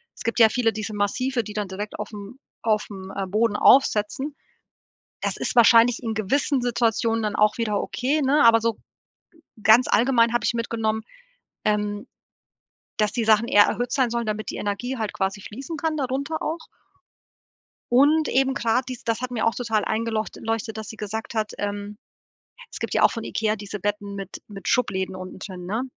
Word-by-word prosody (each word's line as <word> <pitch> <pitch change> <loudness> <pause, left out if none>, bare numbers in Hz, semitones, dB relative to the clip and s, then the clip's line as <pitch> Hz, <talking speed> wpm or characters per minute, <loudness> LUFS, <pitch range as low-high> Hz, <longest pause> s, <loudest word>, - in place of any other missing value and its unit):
es - - -10
gibt 230 - -1
ja 225 - +9
viele 230 -2 +1
diese 215 0 -5
massive, 240 +5 0
die 210 - -8
dann 210 -1 -2
direkt 205 +3 -6
aufm 210 +3 -8 0.2
aufm, 205 -3 -2
äh, 195 -1 -2
Boden 210 +2 +1
aufsetzen. 265 +4 +3 0.9
Das - - -1
ist - - -2
wahrscheinlich 235 0 +6
in 225 -3 -3
gewissen 255 +6 0
Situationen 230 -1 +1
dann 210 -1 -1
auch 210 0 +3
wieder 210 -3 0
okay, 280 +5 -1
ne? 285 +2 +3
Aber 225 -1 +6
so 230 -1 0
g - - -30 0.8
ganz 230 +3 +6
allgemein 235 0 +3
habe 240 - 0
ich - - +2
mitgenommen, 225 -1 -1 0.6
ähm, 210 0 -1 0.9
dass 210 -1 +1
die 230 0 -1
Sachen 220 +1 +4
eher 205 - +6
erhöht 245 +3 -2
sein 255 -3 +2
sollen, 235 0 -2
damit 215 0 -3
die - - -5
Energie 240 +6 -3
halt 215 -2 -3
quasi 195 +1 -2
fließen 270 - -7
kann, 315 +1 -1
darunter 280 +4 -2
auch 320 +1 -4 1.3
und 290 +5 +4
eben 265 +1 +2
grade 235 +2 +1
dies 255 0 -7
das 230 0 -1
hat 255 - -3
mir 230 -2 -1
auch 225 - +2
total 225 -4 -1
eingelocht 220 0 -2
leuchtet, 225 -1 -2
dass 220 -2 -6
sie 220 - -8
gesagt 220 +2 -5
hat, 215 -1 -1
ähm, 205 0 -4 0.7
es - - -8
gibt - - -4
ja - - +2
auch - - +6
von 230 -2 -5
IKEA 220 -1 -1
diese 205 0 -7
Betten 205 0 -3
mit 195 -1 -8
mit 195 -1 -7
Schubläden 190 -6 0
unten 185 0 -8
drin, 185 -2 -8
ne? 220 +6 -1
225 Hz, 185 wpm, -24 LUFS, 210-245 Hz, 1.3 s, ja